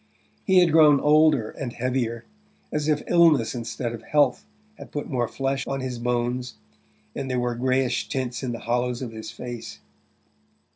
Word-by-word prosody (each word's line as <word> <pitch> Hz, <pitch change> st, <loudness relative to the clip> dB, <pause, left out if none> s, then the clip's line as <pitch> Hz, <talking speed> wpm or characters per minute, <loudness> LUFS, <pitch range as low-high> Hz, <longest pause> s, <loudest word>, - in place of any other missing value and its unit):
He 190 Hz, -1 st, +4 dB
had 175 Hz, -2 st, +3 dB
grown 150 Hz, -3 st, +6 dB
older 150 Hz, -6 st, +4 dB
and 125 Hz, -4 st, -6 dB
heavier, 120 Hz, -2 st, -2 dB, 0.5 s
as 150 Hz, 0 st, -1 dB
if 150 Hz, -1 st, +1 dB
illness 165 Hz, -9 st, +4 dB
instead 115 Hz, 0 st, -4 dB
of 115 Hz, -, -7 dB
health 145 Hz, -4 st, +1 dB, 0.3 s
had -, -, -11 dB
put 145 Hz, -, -4 dB
more 120 Hz, -3 st, 0 dB
flesh 135 Hz, +1 st, -2 dB
on 135 Hz, -1 st, -2 dB
his 125 Hz, -2 st, -4 dB
bones, 125 Hz, +1 st, -2 dB, 0.6 s
and 135 Hz, -, -4 dB
there 125 Hz, -1 st, 0 dB
were 120 Hz, 0 st, -1 dB
greyish 130 Hz, +1 st, 0 dB
tints 125 Hz, -2 st, -3 dB
in 130 Hz, -3 st, -3 dB
the 115 Hz, -, -6 dB
hollows 125 Hz, +1 st, -1 dB
of 120 Hz, -, -5 dB
his 110 Hz, -1 st, -8 dB
face. 120 Hz, -2 st, -7 dB
125 Hz, 165 wpm, -24 LUFS, 120-140 Hz, 0.6 s, grown